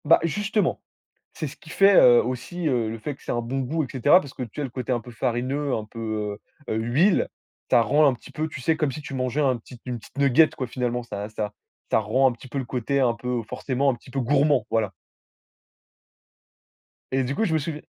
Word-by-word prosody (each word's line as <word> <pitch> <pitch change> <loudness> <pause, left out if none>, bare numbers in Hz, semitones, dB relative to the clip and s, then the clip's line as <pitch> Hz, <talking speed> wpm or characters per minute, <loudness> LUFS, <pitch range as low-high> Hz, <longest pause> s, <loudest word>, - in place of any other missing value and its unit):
Bah - - +6
justement, 205 +3 0 0.5
c'est 155 - -4
ce 135 - -9
qui 175 - -16
fait, 195 +3 +5
heu, 120 -1 +7
aussi, 140 +8 -3
heu, 120 -5 +1
le 115 - -5
fait 130 +6 -5
que - - -25
c'est - - -3
un 120 - 0
bon 125 +4 -3
goût 150 +5 -1
et - - -4
cetera, 145 +7 +5
parce 140 -6 -9
que, 130 - -5
tu 120 - -7
sais, 150 - -2
le 135 - -3
côté 130 0 -4
un 120 - +2
peu 120 +2 -11
farineux, 130 +4 -1
un 110 - -4
peu, 110 -2 -4 0.3
heu, - - 0
l'huile, 125 - +2 0.4
ça - - +6
rend 150 +7 +4
un 135 - +4
petit - - -15
peu, 155 +1 -2
tu 140 - -8
sais, 160 +5 +2
comme 150 -3 0
si 150 - -7
tu 145 - -8
mangeais 130 +2 -1
un 130 -4 +2
petit 120 +1 -14
une 125 -2 -4
petite 110 - -17
nugget, 140 +3 +5
quoi, 130 - -4
finalement, 120 0 -2
ça 105 -2 -5
ça 105 -1 -4 0.4
ça - - +4
rend 115 +6 +3
un - - -3
petit 120 +2 -11
peu 135 - -5
le 135 - -2
côté, 130 +2 -1
un 125 -3 +3
peu, 120 0 -3
forcément, 135 +3 0
un - - -3
petit 120 - -17
peu 135 - -2
gourmand, 145 +4 +3
voilà 110 -4 +1 2.2
et 135 0 +1
du 130 +3 -2
coup, 225 - 0
je 165 - 0
me 160 - +3
souviens 150 0 -5
130 Hz, 240 wpm, -25 LUFS, 120-145 Hz, 2.2 s, heu